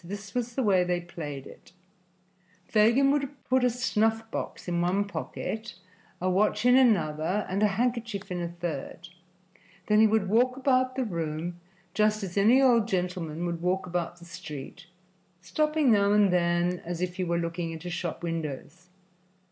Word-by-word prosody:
This 200 +3 -8
was 245 -1 -3
the 265 - 0
way 190 -4 +4
they 180 0 0
played 150 -6 -7
it: - - -15 0.9
Fagin 235 +6 +4
would 280 -2 0
put 260 0 +1
a 250 - +4
snuff 225 -2 0
box - - -5
in 175 -1 0
one 190 +4 +1
pocket, 215 +2 -5 0.4
a 185 - -1
watch 210 +4 +1
in 250 0 +6
another 190 -6 +2
and 190 +2 -2
a 210 - +5
handkerchief 230 -2 -2
in 175 -1 -2
a 170 - -2
third; 170 0 -6 0.8
then 210 0 +3
he 220 - +7
would 215 -2 +1
walk 250 +5 +2
about 255 -1 +2
the 260 -1 -1
room 170 -2 -4 0.3
just 215 +1 +2
as 180 -2 -6
any 220 +6 +5
old 240 -5 +4
gentleman 180 -4 -2
would 170 -1 -3
walk 185 +2 0
about 175 -1 -3
the 170 - -14
street, 165 0 -9 0.5
stopping 300 - +1
now 200 -1 +4
and 205 -3 +4
then, 175 0 +1
as 175 +1 -4
if 180 0 -4
he 185 - -1
were 170 -1 0
looking 170 0 -3
into 165 +2 -6
shop 175 -1 -4
windows. 165 +1 -5
185 Hz, 170 wpm, -27 LUFS, 175-225 Hz, 0.9 s, he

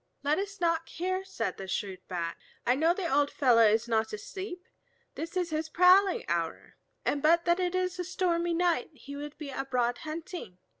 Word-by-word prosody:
"Let 295 +4 +2
us 400 0 -5
knock 335 -1 +1
here," 370 +2 -2
said 385 - -3
the 195 - -7
shrewd 190 -1 -3
Bat, 170 -2 -3 0.3
"I 245 - +4
know 320 +6 +3
the 355 0 -1
old 285 -1 +3
fellow 245 -4 +4
is 220 +2 +2
not 220 -1 0
asleep. 365 - -6 0.5
This 335 +3 -5
is 355 -2 -1
his 315 0 -2
prowling 365 +3 +5
hour, 170 -1 -3 0.3
and 285 - +1
but 335 +3 +4
that 345 +1 +3
it 360 0 0
is 365 0 -1
a - - 0
stormy 345 -2 0
night 350 0 +1
he 280 +1 -10
would 290 +1 -7
be 295 -3 -6
abroad 250 -3 -1
hunting. 315 - -7
320 Hz, 190 wpm, -29 LUFS, 250-360 Hz, 0.5 s, prowling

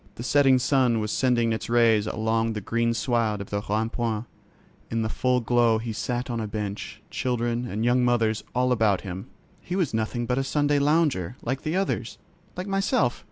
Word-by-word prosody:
The 120 - -7
setting 135 0 +4
sun 125 -3 +2
was 105 0 -2
sending 120 -3 +2
its 110 - -4
rays 115 -3 +4
along 110 +1 0
the 105 - -3
green 115 +3 0
sward 115 -3 0
of 100 - -8
the 100 0 -1
Rond 110 +2 0
point: 115 -2 -2 0.6
in 115 0 -1
the 110 - -1
full 125 +2 +1
glow 120 -1 +3
he 115 0 -4
sat 120 +3 -3
on 120 -2 -3
a 110 - -3
bench, 105 0 -5
children 120 -1 -1
and 110 +1 -2
young 125 +1 +3
mothers 115 -3 +1
all 125 +1 +2
about 110 -5 +2
him. 95 +3 -7 0.3
He 180 - -4
was 180 -10 0
nothing 110 +2 -1
but 125 +2 0
a - - 0
Sunday 145 +1 +1
lounger, 140 - +1
like 130 +3 -2
the 155 +3 -2
others, 195 +1 -2 0.4
like 180 - -3
myself. 195 -11 +1
120 Hz, 195 wpm, -25 LUFS, 110-125 Hz, 0.6 s, setting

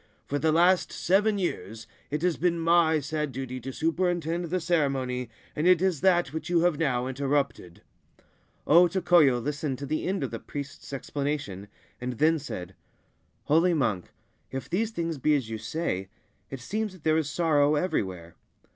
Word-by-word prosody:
For 145 - -2
the 160 +1 +2
last 175 +3 +3
seven 205 +3 +2
years 115 - -4 0.2
it 150 +3 -3
has 180 -2 +2
been 170 0 0
my 165 -1 +4
sad 150 0 -3
duty 130 -1 -5
to 130 +2 -6
superintend 170 +2 -1
the 180 +2 -1
ceremony, 135 -7 0 0.3
and 155 +3 +1
it 180 -2 +6
is 185 -5 0
that 175 -6 +3
which 160 - -5
you 175 -1 +3
have 175 -3 +2
now 125 -6 +1
interrupted/ 135 -8 -2 0.8
O 175 +4 +6
Tokoyo 170 -7 +4
listened 145 +1 -3
to 140 - -6
the 155 +4 -2
end 190 -5 -1
of 130 - -3
the 115 - -5
priest's 140 -1 -8
explanation, 140 -7 -4 0.3
and 125 0 -3
then 155 +6 +2
said: 90 -10 -7 0.4
* - - -42
Holy 165 +3 +3
monk, 105 - 0 0.4
if 135 0 -5
these 215 +5 0
things 165 -7 -3
be 150 +3 +3
as 125 -6 -2
you 110 - -4
say, 95 - -3 0.4
it 135 -2 -7
seems 210 - -3
that 180 -5 -16
there 155 0 +3
is 155 -3 -1
sorrow 150 -2 +2
everywhere. 95 - -2
150 Hz, 175 wpm, -27 LUFS, 130-175 Hz, 0.8 s, it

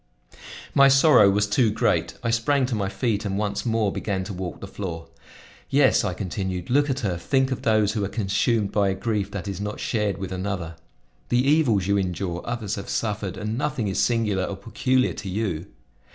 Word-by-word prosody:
My 140 0 +7
sorrow 135 -6 +6
was 105 +1 +2
too 110 +3 +2
great; 105 - 0
I 115 - +1
sprang 130 +4 +2
to 125 - -3
my 100 -3 -1
feet 105 +1 -1
and 100 -2 -2
once 105 +2 -2
more 110 -3 +1
began 100 -3 -2
to 95 - -6
walk 90 -1 -5
the 100 - -7
floor. 85 -5 -6 0.6
"Yes," 135 -3 +4
I 95 -4 -2
continued, 95 0 -4
"look 145 +2 +3
at 135 0 -1
her; 95 -5 -1
think 135 +6 +1
of 130 - -2
those 110 -2 +2
who 105 -2 -2
are - - 0
consumed 105 +1 0
by 100 -2 +2
a 95 - -1
grief 105 -1 -2
that 100 -1 -6
is 100 -1 -4
not 105 +1 -4
shared 105 -4 -1
with 95 -2 -5
another. 95 -3 -3 0.6
The 125 +2 +2
evils 135 - +3
you 100 +1 +2
endure, 90 -2 -3
others 115 -4 -3
have 100 - -7
suffered, 105 -3 -2
and 110 +3 -3
nothing 130 -7 -1
is 95 - 0
singular 105 -6 +1
or 100 - -5
peculiar 125 +5 0
to 100 - -7
you. 95 -4 -2
105 Hz, 200 wpm, -24 LUFS, 95-115 Hz, 0.6 s, My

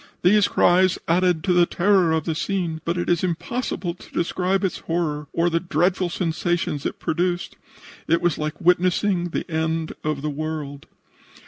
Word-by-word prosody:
These 205 +3 +5
cries 185 +1 +3
added 175 -1 +2
to 185 -2 +2
the 175 -1 +4
terror 185 -2 +3
of 160 -1 +1
the 165 - 0
scene, 165 -1 -2
but 170 +1 -1
it 175 - -2
is 175 0 +1
impossible 180 +1 -2
to 180 - -16
describe 185 +3 0
its 190 - -1
horror 155 -3 -2
or 170 +1 +1
the 170 -1 +1
dreadful 180 +2 0
sensations 170 -3 -1
it - - -6
produced. 175 +2 -1 0.5
It 165 +1 +3
was 175 -2 0
like 155 0 -3
witnessing 180 +1 +2
the - - -3
end 160 0 -1
of 150 -2 -2
the 150 - -1
world. 150 -1 -5
175 Hz, 165 wpm, -23 LUFS, 160-180 Hz, 0.5 s, These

